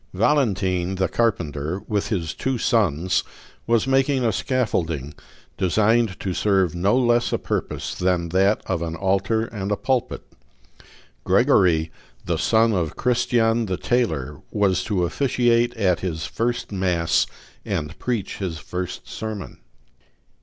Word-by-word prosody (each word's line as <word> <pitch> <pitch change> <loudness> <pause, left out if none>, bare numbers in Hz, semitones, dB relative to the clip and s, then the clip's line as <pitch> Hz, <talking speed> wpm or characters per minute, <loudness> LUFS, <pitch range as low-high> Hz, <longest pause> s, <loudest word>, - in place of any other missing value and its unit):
Valentine 95 -7 +1
the 95 0 +1
carpenter, 85 -7 -1
with 105 -2 -1
his 85 -8 -2
two 130 -1 -2
sons, 95 - +1 0.4
was 115 -1 +3
making 135 -1 +2
a 115 - +3
scaffolding, 85 - -1 0.5
designed 110 +2 +2
to 95 - -3
serve 95 -4 +2
no 95 +7 +2
less 120 -1 +2
a - - +1
purpose - - -3
than 90 -2 0
that 95 +4 +2
of 90 -3 -2
an 80 -1 -3
altar 100 +5 +1
and 100 -3 -5
a - - +3
pulpit. 130 -3 -1 1.0
Gregory, 80 -3 +3 0.3
the 85 -2 0
son 115 +5 +3
of 85 -6 -1
Christian 120 -2 +1
the 95 -1 -2
tailor, 105 - -1
was 100 -3 +1
to 100 -5 0
officiate 120 +1 +1
at 90 -6 +2
his 80 -3 -3
first 120 0 -2
mass 90 -6 +1 0.4
and 75 +1 -4
preach 115 -6 -2
his 90 -5 -3
first 90 +4 -6
sermon. 110 -3 -6
100 Hz, 130 wpm, -23 LUFS, 90-115 Hz, 1.0 s, was